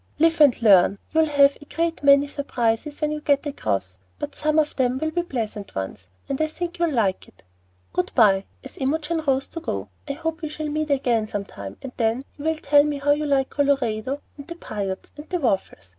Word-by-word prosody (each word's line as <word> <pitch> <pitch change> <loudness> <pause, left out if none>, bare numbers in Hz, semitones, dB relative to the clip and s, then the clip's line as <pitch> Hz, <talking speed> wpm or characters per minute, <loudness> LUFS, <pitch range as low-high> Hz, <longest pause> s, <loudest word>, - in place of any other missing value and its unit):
"Live 325 0 +3
and 285 -5 +6
learn. 195 -2 +6
You'll 320 0 +4
have 285 -1 +4
a - - -12
great 330 +2 -2
many 280 0 +6
surprises 280 -1 -2
when 300 0 +1
you 300 0 -3
get 285 -1 +2
across, 95 - -2 0.2
but - - -5
some 305 0 0
of 305 -1 +2
them 255 -1 +1
will 315 +3 -1
be 345 - 0
pleasant 225 - -5
ones, 95 -1 -5 0.2
and 275 +2 -2
I 310 - +2
think 345 +2 -5
you'll 340 -1 +2
like 220 -9 0
it. - - -22 0.5
Good 180 - -1
by," 195 -4 +5 0.2
as 265 - -11
Imogen 310 +4 0
rose 270 0 +2
to 330 - -6
go; 100 - -4 0.2
"I 280 - -2
hope 325 +2 -4
we 310 - -3
shall 305 0 -4
meet 305 +1 -2
again 245 -6 +1
some 205 -2 -4
time, 100 - -9
and 265 - -6
then 230 +3 0
you 290 - -9
will 320 0 +2
tell 290 -1 +5
me 295 -1 -1
how 285 +1 +1
you 300 +1 +1
like 270 -2 +1
Colorado, 275 -2 0 0.2
and 280 - -10
the 340 - -7
Piutes, 200 - -5
and 295 +4 -11
waffles. 190 - -1
280 Hz, 215 wpm, -23 LUFS, 220-305 Hz, 0.5 s, and